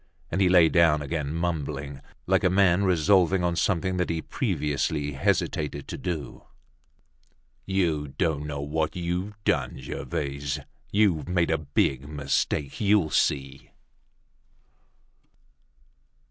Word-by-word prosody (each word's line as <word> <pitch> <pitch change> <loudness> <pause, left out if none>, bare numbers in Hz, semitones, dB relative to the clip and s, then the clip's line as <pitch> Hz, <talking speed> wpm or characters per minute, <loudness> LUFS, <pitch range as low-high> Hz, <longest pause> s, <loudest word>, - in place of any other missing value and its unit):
And 95 - 0
he 95 - +4
lay 90 -2 +6
down 80 -3 +3
again, 75 -1 -3
mumbling, 75 -5 -3 0.2
like - - +2
a - - +4
man 95 0 +3
resolving 90 +1 +3
on 85 -1 +1
something 95 +1 0
that 90 - 0
he 85 -1 -1
previously 75 -1 -1
hesitated 70 +1 -1
to - - -4
do: 85 -5 -5 1.2
"You 85 -6 0
don't 75 +1 -1
know 70 -1 -4
what 80 +2 -2
you've 90 +4 -3
done, 65 -7 0
Gervaise. 70 +1 -4 0.3
You've 100 -6 +2
made 85 -2 +1
a 80 - +1
big 70 -2 0
mistake; 75 0 -1
you'll 100 -6 +3
see." 70 -1 0
80 Hz, 120 wpm, -26 LUFS, 70-90 Hz, 1.2 s, lay